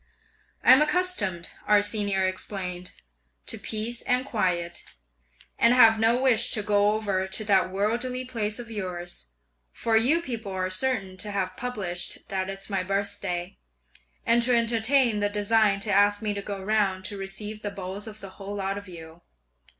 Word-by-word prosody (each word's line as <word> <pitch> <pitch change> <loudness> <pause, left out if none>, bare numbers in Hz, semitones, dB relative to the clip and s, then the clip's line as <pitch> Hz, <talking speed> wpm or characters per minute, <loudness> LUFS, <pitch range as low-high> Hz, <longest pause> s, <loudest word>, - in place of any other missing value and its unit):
"'I'm 260 +3 +8
accustomed,' 300 - 0 0.2
our 210 -1 +5
Senior 200 -2 +1
explained, 185 -1 -4 0.5
'to 225 - -3
peace 220 +3 -3
and 250 0 0
quiet, 180 -8 -1 0.8
and 235 +2 +5
have 225 -3 +7
no 225 +2 +3
wish 250 -4 +3
to 210 - 0
go 205 0 +3
over 200 -3 -1
to 190 +3 -1
that 195 -3 +3
worldly 240 +6 -1
place 220 -4 -2
of 235 -2 -8
yours; 175 - -6 0.4
for 225 - 0
you 255 +9 +4
people 230 - -5
are 185 0 -2
certain 195 -3 -1
to 210 +3 -5
have 190 -2 -2
published 205 -8 -4
that 190 -1 -2
it's 195 0 -7
my 195 -3 -1
birthday, 185 -2 -3 0.7
and 235 +1 +4
to 245 +1 +3
entertain 235 0 +3
the 205 0 +1
design 205 0 +2
to 210 - -2
ask 205 +1 +4
me 210 -1 -1
to 200 - -4
go 200 0 -5
round 195 -3 +1
to 205 - -4
receive 205 +2 -6
the 205 - -3
bows 200 +1 -6
of 215 0 -9
the 195 - -8
whole 195 +1 -8
lot 195 0 -2
of 200 - -14
you. 165 -1 -11
205 Hz, 165 wpm, -26 LUFS, 190-225 Hz, 0.8 s, I'm